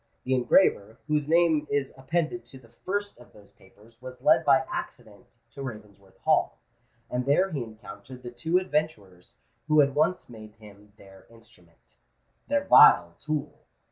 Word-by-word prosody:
The 130 - -1
engraver, 120 - +2
whose 150 -2 -1
name 160 -3 +2
is 140 -2 -2
appended 160 +6 -3
to 135 - -13
the 120 -3 -19
first 200 - -5
of 120 - -18
those 105 -1 -19
papers, 110 +5 -23
was 130 0 -10
led - - +3
by - - +3
accident - - -9
to 140 - -10
Ravensworth 105 -6 -11
Hall; - - +1 0.5
and 125 +1 -4
there 185 +7 +2
he 145 -5 -3
encountered 115 +3 -12
the 120 - -8
two 160 +9 -1
adventurers 150 - -4 0.3
who 155 -1 +3
had 140 -2 +3
once 160 +5 0
made 110 -2 -13
him 105 -2 -17
their 95 -2 -18
instrument—their 90 - -9
vile 85 0 +6
tool! 150 0 -5
125 Hz, 150 wpm, -26 LUFS, 105-150 Hz, 0.5 s, vile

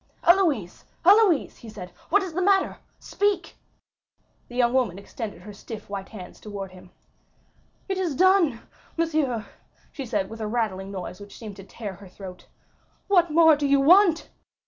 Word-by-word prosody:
"Héloïse, 325 - +2 0.2
Héloïse!" 395 -5 +5
he 230 - -11
said, 185 -4 -9 0.2
"what 400 +4 +3
is 365 -3 -6
the 365 - -1
matter? 390 0 +2 0.2
Speak!" 400 -4 -1 0.9
The 245 - -12
young 245 -1 +2
woman 240 -9 +1
extended 200 -2 -7
her 210 +1 -10
stiff 210 0 -10
white 195 -1 -5
hands 190 -5 -10
towards 200 -3 -7
him. 185 0 -14 1.0
"It 385 -1 -2
is 345 -7 -1
done, 360 -9 +3 0.4
monsieur," 300 -9 0 0.5
she 270 -3 -7
said 205 -4 -1
with 225 +2 -9
a 215 - -2
rattling 210 -4 -2
noise 185 -2 -7
which 205 0 -12
seemed 210 -3 -9
to 195 - -10
tear 200 +1 -7
her 200 -1 -13
throat. 185 -1 -11 0.6
"What 350 -4 +4
more 320 0 +6
do 290 0 -1
you 280 0 +4
want?" 340 +3 +5
240 Hz, 165 wpm, -25 LUFS, 200-335 Hz, 1.0 s, more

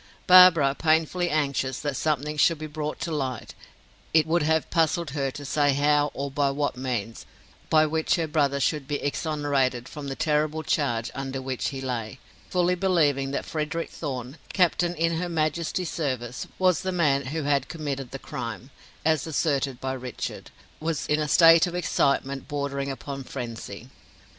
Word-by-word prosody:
Barbara, 180 -7 +8
painfully 160 +3 +1
anxious 140 -4 0
that 145 -2 -2
something 150 +1 -1
should 165 +2 +3
be 155 - -6
brought 150 0 -4
to 170 - -3
light, 130 -5 -3 0.6
it 160 - +6
would 165 +2 +1
have 160 +1 +1
puzzled 165 -1 +1
her 140 -2 -1
to 145 +2 -8
say 145 0 +2
how 145 +1 +3
or 140 0 -3
by 140 0 +1
what 145 0 -1
means, 120 -4 -4 0.4
by 155 0 +5
which 160 +1 +1
her 165 - 0
brother 145 -3 +1
should 145 0 0
be 145 - -1
exonerated 145 -4 -1
from 145 -2 -7
the 135 - -4
terrible 155 +1 0
charge 120 -9 0
under 135 0 -4
which 130 -1 -3
he 135 -2 -6
lay; 125 -2 -4 0.3
fully 180 0 +2
believing 155 -7 +2
that 140 - -3
Frederick 160 +2 -3
Thorn, 130 -2 -5 0.2
captain 175 -1 +2
in 165 0 +1
her 175 +1 -2
majesty's 165 +2 -1
service, 130 -6 -3
was 185 -3 +3
the 190 - -2
man 140 -6 +1
who 155 +3 -3
had 140 -2 +1
committed 140 -5 -4
the - - -6
crime, - - -6 0.3
as 160 0 +2
asserted 140 -4 0
by 130 0 -3
Richard, 125 -2 -6 0.3
was 160 -1 -2
in 150 +1 +1
a 150 - -1
state 165 +2 +7
of 175 - -5
excitement 140 -5 0
bordering 140 -1 -3
upon 135 +1 -6
frenzy. 120 -2 -7
145 Hz, 165 wpm, -26 LUFS, 135-160 Hz, 0.6 s, Barbara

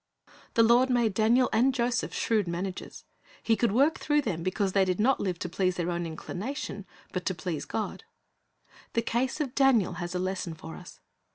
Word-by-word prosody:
The 230 - +6
Lord 240 +3 +5
made 240 -4 +2
Daniel 230 +5 +4
and 255 +3 +3
Joseph 240 -1 0
shrewd 215 -5 0
managers. 180 +2 -5 0.4
He 225 - +3
could 235 -1 +1
work 280 +9 +3
through 295 0 +2
them 170 -10 -2
because 190 +2 0
they 195 - +4
did 185 0 0
not 255 +5 +3
live 185 -3 -1
to 180 - -4
please 185 +1 0
their 175 0 -1
own 170 0 -2
inclination, 200 - -5 0.3
but 185 - -2
to 185 - 0
please 160 -2 -4
God. 215 - -4 0.9
The 230 - +1
case 250 +5 -1
of 275 -5 -2
Daniel 260 -10 +3
has 175 +1 -4
a - - +1
lesson 185 -2 -3
for 160 0 -9
us. 180 - -12
205 Hz, 190 wpm, -28 LUFS, 180-245 Hz, 0.9 s, The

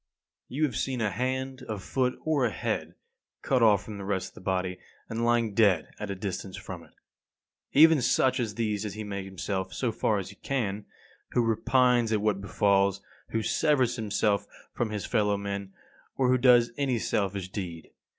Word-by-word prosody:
34. - - -8
You 155 - +1
have 135 -7 +1
seen 130 0 -1
a 110 -3 0
hand, 130 +4 -2
a 110 - -2
foot, 125 +6 -1
or 155 -4 +1
a 120 - +3
head, 100 - -3 0.5
cut 130 -2 +2
off 105 -4 +5
from 105 -2 -8
the - - -6
rest 95 -1 -2
of - - -27
the - - -13
body, 90 -1 -1 0.3
and 115 +1 -3
lying 120 -2 +2
dead 100 -6 +3
at 105 - -5
a 100 - -2
distance 95 -1 -5
from - - -8
it. - - -21 0.8
Even 160 0 +7
such 130 +1 +2
as 110 -4 -2
these 105 -3 -1
does 105 -3 -4
he 110 - -5
make 100 -2 -5
himself, 95 0 -4
so 125 -3 0
far 110 -1 +1
as 95 -2 -4
he 100 - -16
can, 105 -7 -2 0.5
who 120 - +3
repines 120 +1 +3
at 110 - +2
what 105 -2 0
befalls, 100 -1 +2 0.3
who 115 -1 -1
severs 130 -5 +2
himself 105 -2 0 0.3
from 120 - -1
his 105 -2 -4
fellow 105 -1 +1
men, 100 -1 -4 0.4
or 130 -2 +2
who 130 - +5
does 120 -2 +5
any 135 -4 +1
selfish 100 -4 -1
deed. 90 -5 -6
105 Hz, 190 wpm, -28 LUFS, 100-125 Hz, 0.8 s, Even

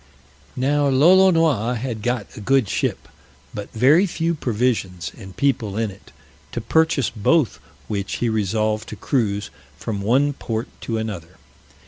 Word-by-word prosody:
Now 145 +3 +1
Lolonois 160 - +4
had 115 -2 -4
got 120 -1 -1
a - - -8
good 135 +1 +2
ship, - - -2 0.5
but 105 - -6
very 145 - +4
few 170 -1 -1
provisions 115 - -1
and 95 -1 -12
people 120 -8 0
in 110 -2 -1
it; 95 - -17 0.4
to - - -2
purchase 160 -5 +2
both 120 - +1 0.3
which 100 -2 -3
he 120 - -1
resolved 110 0 0
to - - -6
cruise 105 -5 -1 0.3
from 105 +2 -4
one 135 +8 +2
port 115 -4 -4
to 115 - -2
another. 95 -6 -5
115 Hz, 140 wpm, -22 LUFS, 105-140 Hz, 0.5 s, Lolonois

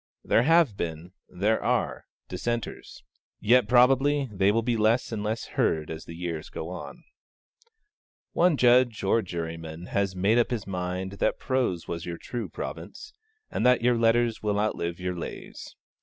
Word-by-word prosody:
There - - +3
have 160 -4 +4
been, 85 0 -5 0.2
there 105 +5 0
are, - - -1 0.2
dissenters; 120 - -4 0.4
yet 120 0 +4
probably 135 +3 +4
they 95 +1 +3
will 115 +2 +1
be 120 0 0
less 110 +3 +2
and 110 -2 -3
less 110 +2 -2
heard 80 -1 0
as 80 0 -7
the 85 - -9
years 85 -2 -5
go 80 - -6
on. 90 -1 -8 1.3
One 175 -3 +3
judge, 125 -2 +4
or 105 +4 +3
juryman, 85 -2 -6
has 100 -2 0
made 100 +6 +3
up 120 - +2
his 120 -6 -3
mind 90 0 -3
that - - +1
prose 125 -10 -1
was 85 0 -5
your 85 -1 -4
true 120 +5 -5
province, 425 0 -7 0.4
and - - -1
that 125 -2 +4
your 125 0 +4
letters 115 0 +2
will 105 -1 0
outlive 85 -5 -2
your 90 0 -3
lays. 85 - -8
105 Hz, 160 wpm, -27 LUFS, 90-120 Hz, 1.3 s, have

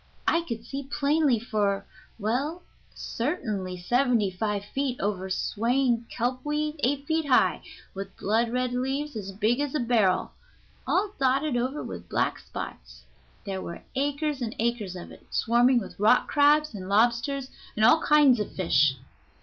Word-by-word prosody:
I 335 - +3
could 230 -8 -6
see 275 +3 -5
plainly 285 -2 +2
for, 205 -4 -1 0.3
well, 265 - -2 0.3
certainly 215 - -3
seventy 235 +1 +2
five 205 +2 -2
feet 265 +2 -2
over 190 -2 -2
swaying 235 +4 0
kelp 250 +2 -2
weed, 300 +1 -2
eight 280 +2 0
feet 320 0 0
high, 260 - +3 0.3
with 195 0 -7
blood 225 +4 +1
red 250 0 -1
leaves 270 +3 -2
as 200 -3 -5
big 215 +6 +1
as 290 0 -2
a - - +1
barrel, 225 -7 +2 0.6
all 395 +2 +1
dotted 270 +1 +2
over 255 +5 -1
with 85 -2 -8
black - - 0
spots. - - -8 0.4
There 190 -1 -4
were 170 - -7
acres 285 +1 -1
and 230 -2 -3
acres 225 -5 -1
of 175 - -9
it, - - -15
swarming 245 +2 +3
with 220 - -4
rock 220 +4 +4
crabs 295 0 +4
and 190 -2 -7
lobsters 240 +6 +1 0.2
and 215 - +3
all 310 +7 +6
kinds 290 -5 +5
of 210 - -3
fish." 150 -6 +3
240 Hz, 155 wpm, -27 LUFS, 205-280 Hz, 0.6 s, all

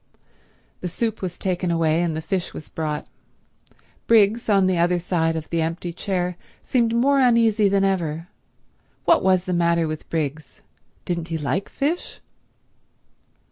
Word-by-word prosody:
The 180 - -4
soup 220 +5 -2
was 180 -2 -4
taken 180 -1 -1
away, 165 -1 +2
and 165 -3 -1
the 160 - -5
fish 190 -1 -2
was - - -8
brought. 155 -2 -3 1.0
Briggs, 225 0 +4
on 195 -2 +4
the 185 -2 +1
other 175 +1 +3
side 165 -2 0
of 160 -1 -4
the 165 -1 +1
empty 165 +2 -3
chair, 180 -1 -2 0.3
seemed 235 -2 +1
more 275 +4 +3
uneasy 230 -4 +4
than 195 0 +2
ever. 170 -4 -1 0.8
What 335 - +5
was 185 -1 +2
the 185 - -2
matter 170 -1 +2
with 155 0 -6
Briggs? 150 -2 -4 0.4
Didn't 170 -2 -2
he 165 -1 -2
like 150 +6 -2
fish? 305 +6 -2
180 Hz, 150 wpm, -23 LUFS, 165-200 Hz, 1.0 s, What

